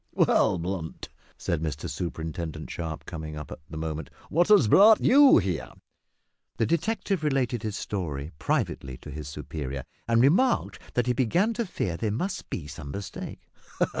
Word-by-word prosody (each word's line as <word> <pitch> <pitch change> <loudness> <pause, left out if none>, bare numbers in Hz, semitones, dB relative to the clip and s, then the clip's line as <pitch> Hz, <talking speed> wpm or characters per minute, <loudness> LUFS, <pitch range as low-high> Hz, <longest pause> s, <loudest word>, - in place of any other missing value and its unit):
"Well, 100 -4 +3
Blunt," 85 -1 -4 0.3
said 85 -3 -1
Mr 75 -2 -3
Superintendent 80 -2 -4
Sharp, 80 -2 -5
coming 80 -3 -6
up 75 -3 -8
at - - -7
that 80 - -7
moment, 80 -1 -4 0.2
"what 170 +3 +3
has 205 - +6
brought 215 - +8
you 280 +1 +7
here?" 95 -7 -1 0.8
The 115 - +2
detective 190 - 0
related 135 -5 +1
his 110 -3 -3
story 80 -7 -4
privately 65 -4 -1
to 75 - -10
his 75 0 -6
superior, 70 -2 -5 0.2
and 115 0 +3
remarked 185 - +3 0.2
that 125 - +2
he 125 - +2
began 170 - +2
to 225 -1 -2
fear 100 - -2
there 110 - -1
must 180 - -3
be 80 - -4
some 75 -1 -8
mistake. 100 +7 -7
95 Hz, 160 wpm, -27 LUFS, -, 0.8 s, brought